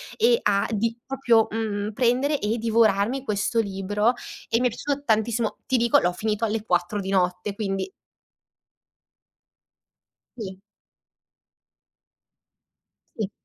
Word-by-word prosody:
e 470 Hz, +1 st, +4 dB
a 200 Hz, 0 st, +2 dB
di 225 Hz, +2 st, 0 dB
proprio. 240 Hz, -5 st, +3 dB
mhmm, 215 Hz, -1 st, -2 dB
prendere 255 Hz, +5 st, +2 dB
e 220 Hz, +1 st, -1 dB
divorarmi 225 Hz, +2 st, +2 dB
questo 210 Hz, +1 st, 0 dB
libro 205 Hz, +3 st, +1 dB, 0.3 s
e 230 Hz, -, +2 dB
mi 250 Hz, -, +3 dB
è -, -, 0 dB
piaciuto 280 Hz, +5 st, -3 dB
tantissimo. 220 Hz, +1 st, +1 dB
Ti 260 Hz, -, 0 dB
dico, 235 Hz, -1 st, +4 dB
l'ho 175 Hz, 0 st, 0 dB
finito 215 Hz, +3 st, -1 dB
alle 215 Hz, 0 st, -2 dB
4 180 Hz, +3 st, 0 dB
di 195 Hz, 0 st, -4 dB
notte, 180 Hz, +1 st, 0 dB
quindi 195 Hz, -, -3 dB, 2.5 s
Sì. 190 Hz, -4 st, -7 dB, 2.6 s
Sì. 210 Hz, -3 st, -2 dB
220 Hz, 115 wpm, -24 LUFS, 200-235 Hz, 2.6 s, e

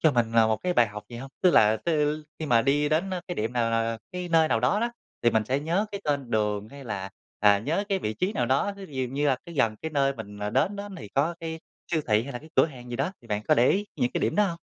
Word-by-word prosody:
cho 155 Hz, -3 st, +4 dB
mình 115 Hz, -2 st, +1 dB
là 115 Hz, -1 st, +5 dB
một 110 Hz, 0 st, +2 dB
cái 180 Hz, +8 st, -1 dB
bài 120 Hz, -9 st, +4 dB
học 105 Hz, 0 st, -8 dB
gì 120 Hz, -, -8 dB
hông? 135 Hz, +3 st, -8 dB
Tức 180 Hz, -, +6 dB
là 110 Hz, -5 st, +5 dB
tứ 150 Hz, 0 st, 0 dB
khi 155 Hz, -, -4 dB
mà 115 Hz, -5 st, +4 dB
đi 145 Hz, +2 st, +2 dB
đến, 165 Hz, +6 st, +1 dB
ơ, 185 Hz, -, -2 dB
cái 175 Hz, -, -2 dB
điểm 110 Hz, -2 st, -2 dB
nào, 115 Hz, -2 st, +1 dB
ờ, 115 Hz, 0 st, 0 dB
cái 180 Hz, -1 st, -4 dB
nơi 165 Hz, -2 st, +4 dB
nào 115 Hz, -3 st, +2 dB
đó 130 Hz, -, +2 dB
đó, 235 Hz, +1 st, 0 dB, 0.3 s
thì 120 Hz, -, +5 dB
mình 110 Hz, -1 st, +2 dB
sẽ 130 Hz, +5 st, 0 dB
nhớ 170 Hz, +8 st, 0 dB
cái 200 Hz, -, -4 dB
tên 140 Hz, -4 st, -1 dB
đường 105 Hz, -1 st, 0 dB
hay 140 Hz, -1 st, -11 dB
là, 95 Hz, -4 st, -4 dB, 0.3 s
à, 105 Hz, -1 st, +6 dB
nhớ 160 Hz, -, -1 dB
cái 195 Hz, -, +1 dB
vị 110 Hz, -, -3 dB
trí 185 Hz, -, -1 dB
nào 125 Hz, -, 0 dB
đó, 135 Hz, +11 st, +1 dB
ví 145 Hz, -, -11 dB
dụ 130 Hz, -, 0 dB
như 145 Hz, +1 st, +1 dB
là 135 Hz, -2 st, +3 dB, 0.2 s
gần 110 Hz, -5 st, +2 dB
cái 160 Hz, -, -3 dB
nơi 140 Hz, -2 st, +2 dB
mình, 105 Hz, -3 st, -9 dB
ờ, 105 Hz, 0 st, -2 dB
đến 135 Hz, -, +1 dB
đó 200 Hz, 0 st, -5 dB
thì 130 Hz, -, -9 dB
có 145 Hz, +10 st, 0 dB
cái 160 Hz, -1 st, -5 dB, 0.3 s
siêu 160 Hz, -, +2 dB
thị 105 Hz, -1 st, +3 dB
hay 140 Hz, +3 st, -7 dB
là 120 Hz, -, -4 dB
cái 155 Hz, -, -15 dB
cửa -, -, +6 dB
hàng 125 Hz, -5 st, -11 dB
gì 120 Hz, -, -3 dB
đó, 140 Hz, +9 st, -1 dB
thì -, -, -16 dB
bạn 105 Hz, 0 st, -1 dB
có -, -, +6 dB
để 120 Hz, +2 st, +4 dB
ý 205 Hz, +2 st, +1 dB
những 125 Hz, -4 st, +1 dB
cái -, -, 0 dB
điểm -, -, 0 dB
đó 210 Hz, -, +5 dB
hông? 170 Hz, -3 st, -4 dB
135 Hz, 305 wpm, -27 LUFS, 115-160 Hz, 0.3 s, Tức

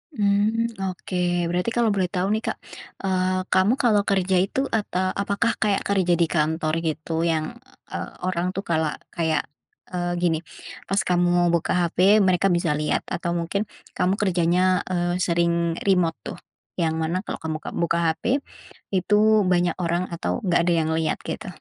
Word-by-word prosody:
Mmm, 215 Hz, +1 st, +1 dB
oke. 185 Hz, 0 st, -6 dB, 0.4 s
Berarti 180 Hz, +5 st, 0 dB
kalau 235 Hz, -2 st, +3 dB
boleh 190 Hz, -3 st, +1 dB
tahu 180 Hz, +1 st, -1 dB
nih, 220 Hz, -, 0 dB
Kak, -, -, -2 dB, 0.5 s
eee, 185 Hz, -1 st, +1 dB
kamu 190 Hz, +5 st, +4 dB
kalau 215 Hz, -4 st, +4 dB
kerja 190 Hz, -1 st, +2 dB
itu 195 Hz, +8 st, 0 dB
ata 185 Hz, -4 st, 0 dB
apakah 200 Hz, +3 st, 0 dB
kayak 205 Hz, -3 st, +1 dB
kerja 190 Hz, -3 st, +1 dB
di -, -, +5 dB
kantor 155 Hz, 0 st, 0 dB
gitu 155 Hz, +1 st, -4 dB, 0.2 s
yang, 155 Hz, -1 st, 0 dB, 0.5 s
eee, -, -, -4 dB
orang 180 Hz, -1 st, -1 dB
tuh 195 Hz, -, -3 dB
kala 160 Hz, -4 st, 0 dB, 0.2 s
kayak, 160 Hz, -2 st, +1 dB, 0.5 s
eee, 175 Hz, -1 st, -2 dB
gini, 165 Hz, -2 st, +2 dB, 0.5 s
pas 195 Hz, +1 st, +1 dB
kamu 175 Hz, -1 st, +2 dB
buka 170 Hz, -1 st, 0 dB
HP 175 Hz, -2 st, 0 dB, 0.3 s
mereka 185 Hz, +1 st, +3 dB
bisa 170 Hz, -3 st, +1 dB
lihat 150 Hz, -, 0 dB
atau 170 Hz, 0 st, -2 dB
mungkin 185 Hz, +5 st, -2 dB, 0.3 s
kamu 185 Hz, +2 st, +2 dB
kerjanya, 180 Hz, 0 st, +2 dB
eee, 175 Hz, 0 st, -1 dB
sering 170 Hz, -1 st, +1 dB
remote 180 Hz, -4 st, +3 dB
tuh -, -, -6 dB, 0.4 s
yang 160 Hz, -2 st, +1 dB
mana 165 Hz, +3 st, -1 dB
kalau -, -, -5 dB
kamu 160 Hz, -1 st, -2 dB
ka -, -, -5 dB
buka 170 Hz, 0 st, +1 dB
HP, 160 Hz, -, -2 dB, 0.7 s
itu 185 Hz, +3 st, +1 dB, 0.3 s
banyak 175 Hz, -1 st, +2 dB
orang 170 Hz, 0 st, 0 dB
atau 170 Hz, -, -2 dB
enggak 180 Hz, -4 st, +2 dB
ada 175 Hz, -, +3 dB
yang 160 Hz, -, -1 dB
lihat 160 Hz, -1 st, 0 dB
gitu? -, -, -5 dB
180 Hz, 165 wpm, -24 LUFS, 170-195 Hz, 0.7 s, di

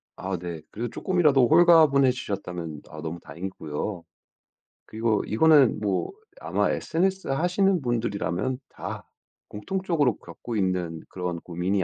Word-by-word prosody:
아 95 Hz, -1 st, -3 dB
네. 85 Hz, -2 st, -6 dB
그래도 120 Hz, +3 st, -4 dB
조금이라도 150 Hz, -9 st, +3 dB
홀가분해지셨다면 130 Hz, -, +3 dB
어 75 Hz, 0 st, -9 dB
너무 80 Hz, +1 st, -5 dB
다행이고요. 85 Hz, 0 st, -5 dB, 0.8 s
그리고 110 Hz, -1 st, 0 dB
이거는 140 Hz, -1 st, +5 dB
뭐 100 Hz, -3 st, -1 dB, 0.3 s
아마 -, -, 0 dB
sns 190 Hz, +3 st, -1 dB
하시는 180 Hz, +4 st, +2 dB
분들이라면 120 Hz, 0 st, -1 dB
다 -, -, -7 dB, 0.4 s
공통적으로 155 Hz, -, -1 dB
겪고 110 Hz, +7 st, -7 dB
있는 90 Hz, -4 st, -1 dB
그런 90 Hz, -2 st, -4 dB
고민이 90 Hz, +3 st, -1 dB
110 Hz, 310 characters per minute, -26 LUFS, 90-150 Hz, 0.8 s, 이거는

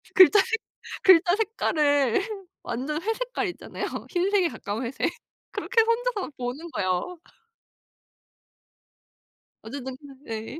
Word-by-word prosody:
글자 380 Hz, +2 st, +8 dB
색 450 Hz, +1 st, +1 dB, 0.4 s
글자 360 Hz, 0 st, +7 dB
색깔을 300 Hz, -, +2 dB, 0.4 s
완전 300 Hz, +6 st, -3 dB
회색깔 450 Hz, 0 st, -2 dB
있잖아요. -, -, -6 dB, 0.2 s
흰색에 370 Hz, 0 st, +2 dB
가까운 220 Hz, -3 st, -4 dB
회색. 255 Hz, +3 st, -1 dB, 0.4 s
그렇게 460 Hz, -2 st, +2 dB
혼자서 465 Hz, -3 st, 0 dB
보는 255 Hz, +7 st, -5 dB
거예요. 185 Hz, -, -1 dB, 2.4 s
어쨌든 260 Hz, +2 st, -6 dB, 0.3 s
네. 225 Hz, +7 st, -5 dB
340 Hz, 225 characters per minute, -26 LUFS, 255-420 Hz, 2.4 s, 글자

